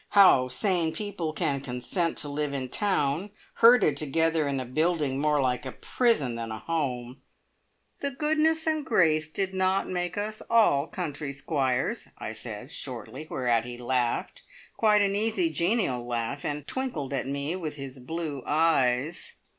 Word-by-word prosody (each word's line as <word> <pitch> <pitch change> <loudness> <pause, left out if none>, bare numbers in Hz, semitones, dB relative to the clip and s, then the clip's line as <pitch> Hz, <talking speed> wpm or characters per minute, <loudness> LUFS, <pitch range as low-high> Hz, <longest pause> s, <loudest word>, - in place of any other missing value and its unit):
How 160 -10 +7
sane 170 - 0
people 200 -7 -3
can 140 -3 -1
consent 140 +7 -2
to 150 - -4
live 145 0 -2
in 130 -2 -3
town, 180 -1 0 0.3
herded 230 - +6
together 160 +1 +1
in 140 -1 -1
a 130 - -4
building 150 0 0
more 150 -1 +2
like 125 -2 0
a 130 - -5
prison 225 - +1
than 115 -1 -5
a 110 - -4
home 130 -4 -3 0.4
" - - -41
"`The 280 -2 -2
goodness 315 +1 +2
and 315 -1 +2
the - - -14
grace' 160 -8 +3
did 190 +4 -2
not 190 +1 +1
make 175 0 -3
us 215 +1 -3
all 190 -11 +4
country 150 -8 -4
squires!" 140 - -1
I - - -5
said 110 +3 -7
shortly, 130 +4 -6
whereat 120 -3 +1
he 120 0 -7
laughed 125 -1 -1 0.3
quite 210 -2 +4
an 200 0 +1
easy, 225 - +2
genial 170 - +1
laugh, 120 +3 -3
and 145 -1 -3
twinkled 180 - -3
at 135 - -1
me 140 +4 -2
with 160 -5 -4
his 135 -2 -8
blue 150 +1 -4
eyes. 155 - +1
150 Hz, 160 wpm, -27 LUFS, 130-190 Hz, 0.4 s, How